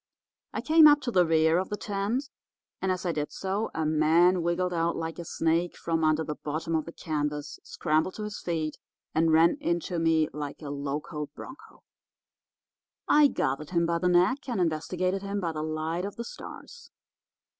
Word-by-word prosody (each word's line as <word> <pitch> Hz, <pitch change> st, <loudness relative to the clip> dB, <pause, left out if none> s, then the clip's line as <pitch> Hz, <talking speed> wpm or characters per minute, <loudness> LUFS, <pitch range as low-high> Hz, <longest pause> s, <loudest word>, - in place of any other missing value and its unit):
I -, -, -3 dB
came 315 Hz, 0 st, +7 dB
up 295 Hz, 0 st, +6 dB
to 255 Hz, -2 st, -2 dB
the 180 Hz, -5 st, +4 dB
rear 160 Hz, +1 st, +4 dB
of 190 Hz, -, -3 dB
the 210 Hz, -, -3 dB
tent, 210 Hz, +7 st, -2 dB, 0.5 s
and, 190 Hz, -, +1 dB
as 185 Hz, 0 st, -3 dB
I 175 Hz, -, +1 dB
did 150 Hz, -2 st, -3 dB
so, 195 Hz, +3 st, -2 dB
a 160 Hz, -, -1 dB
man 160 Hz, +4 st, +4 dB
wiggled 175 Hz, +2 st, 0 dB
out 170 Hz, 0 st, 0 dB
like 165 Hz, +1 st, -4 dB
a -, -, -4 dB
snake 165 Hz, +2 st, 0 dB
from 165 Hz, -1 st, -1 dB
under 155 Hz, 0 st, +3 dB
the 150 Hz, -, -3 dB
bottom 155 Hz, +2 st, -4 dB
of 160 Hz, -2 st, 0 dB
the 170 Hz, -, -8 dB
canvas, 150 Hz, -2 st, -3 dB
scrambled 160 Hz, +3 st, 0 dB
to 215 Hz, -, -5 dB
his 210 Hz, 0 st, -5 dB
feet, 160 Hz, -3 st, -3 dB, 0.3 s
and 160 Hz, +1 st, +3 dB
ran 165 Hz, -, +5 dB
into 170 Hz, -2 st, -1 dB
me 160 Hz, -1 st, +3 dB
like 150 Hz, +1 st, -6 dB
a 145 Hz, -, -5 dB
locoed 145 Hz, +1 st, -4 dB
bronco. 280 Hz, +5 st, -12 dB, 1.2 s
I 300 Hz, -1 st, +6 dB
gathered 150 Hz, -, -2 dB
him 170 Hz, -2 st, +1 dB
by 170 Hz, 0 st, 0 dB
the 180 Hz, +1 st, +1 dB
neck 185 Hz, +11 st, +2 dB
and 235 Hz, -5 st, -1 dB
investigated 180 Hz, +3 st, -1 dB
him 200 Hz, +1 st, -3 dB
by 170 Hz, -4 st, -1 dB
the 155 Hz, -1 st, -4 dB
light 155 Hz, +2 st, -2 dB
of 200 Hz, -, -6 dB
the 235 Hz, -, -5 dB
stars. 475 Hz, -, -10 dB
170 Hz, 190 wpm, -28 LUFS, 155-190 Hz, 1.2 s, came